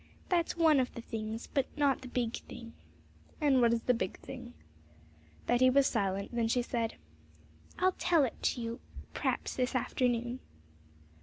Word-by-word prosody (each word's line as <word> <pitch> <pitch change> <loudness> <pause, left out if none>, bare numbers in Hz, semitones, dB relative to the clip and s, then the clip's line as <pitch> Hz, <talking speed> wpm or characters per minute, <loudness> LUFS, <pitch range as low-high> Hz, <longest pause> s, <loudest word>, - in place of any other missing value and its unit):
'That's 345 -2 +1
one 320 -4 +5
of 255 - 0
the 235 - -5
things, 220 +1 -4
but 275 -2 0
not 285 -2 +2
the 260 - -8
big 240 -2 -1
thing.' 230 -1 -10 0.7
'And 280 -4 +4
what 235 -1 +5
is 235 -1 0
the 250 - +3
big 225 -5 -2
thing?' 80 - -9 0.9
Betty 250 +2 +5
was 275 +1 +5
silent; 200 -2 -1
then 235 -1 +1
she 245 +2 +2
said, 230 -2 -2 0.8
'I'll 370 0 +3
tell 335 -4 +4
it 250 - -3
to 245 - 0
you 230 0 -4 0.3
p'raps - - -1
this 255 +1 0
afternoon.' 245 -1 0
245 Hz, 160 wpm, -32 LUFS, 230-270 Hz, 0.9 s, one